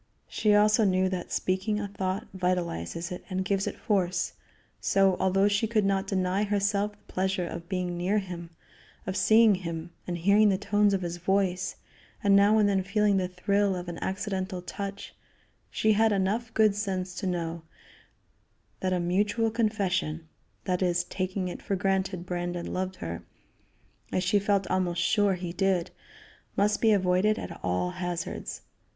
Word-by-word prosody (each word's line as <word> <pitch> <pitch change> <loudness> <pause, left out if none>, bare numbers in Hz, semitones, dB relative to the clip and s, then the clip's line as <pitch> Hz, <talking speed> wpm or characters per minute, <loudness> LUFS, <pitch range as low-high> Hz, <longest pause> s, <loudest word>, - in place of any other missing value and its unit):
She 210 -2 +2
also 210 +2 +5
knew 185 -1 +2
that 185 -2 -4
speaking 190 +3 0
a 205 - -3
thought 190 -1 -3
vitalizes 175 - -2
it 180 - -6
and 185 0 -2
gives 195 -1 0
it - - -4
force; 185 -5 0 0.5
so, 195 -1 +3
although 195 +1 +3
she 205 +2 +1
could 215 -2 +1
not 195 0 +1
deny 190 0 0
herself 205 0 0
the 205 - -21
pleasure 190 -1 0
of 170 0 -7
being 180 -2 -2
near 185 +4 +1
him, 175 -4 -5 0.6
of 190 - -3
seeing 220 +2 +5
him, 170 -2 -5 0.2
and 175 -1 -2
hearing 200 +5 +4
the 190 - +2
tones 205 0 +2
of 190 - -2
his 175 0 -3
voice, 185 0 0 0.5
and 200 -1 +5
now 200 +2 +5
and 210 -1 +4
then 195 -1 +2
feeling 200 +1 +2
the 185 -1 0
thrill 200 +2 +1
of 175 0 -6
an 170 -1 -5
accidental 190 -1 -3
touch, 200 +2 -6 0.6
she 215 0 +2
had 220 +1 +3
enough 205 +4 0
good 215 -2 +5
sense 190 -3 -2
to 190 - -4
know 170 -2 -2 1.2
that 185 -1 0
a 180 - +1
mutual 205 +6 +1
confession, 190 -8 -1 0.4
that 180 -1 -1
is, 175 -1 +2
taking 185 +1 -3
it 180 - -6
for 200 - -1
granted 190 -1 -1
Brandon 175 -1 -3
loved 185 0 -2
her, 85 - -5 0.9
as 185 - 0
she 205 +3 +3
felt 200 -1 +1
almost 180 -2 0
sure 205 -3 +3
he 175 -1 -5
did, 190 -2 +1 0.7
must 205 +1 +2
be 225 - +5
avoided 195 +2 +3
at 170 - -7
all 90 - 0
hazards. 175 -1 -4
190 Hz, 165 wpm, -28 LUFS, 180-205 Hz, 1.2 s, also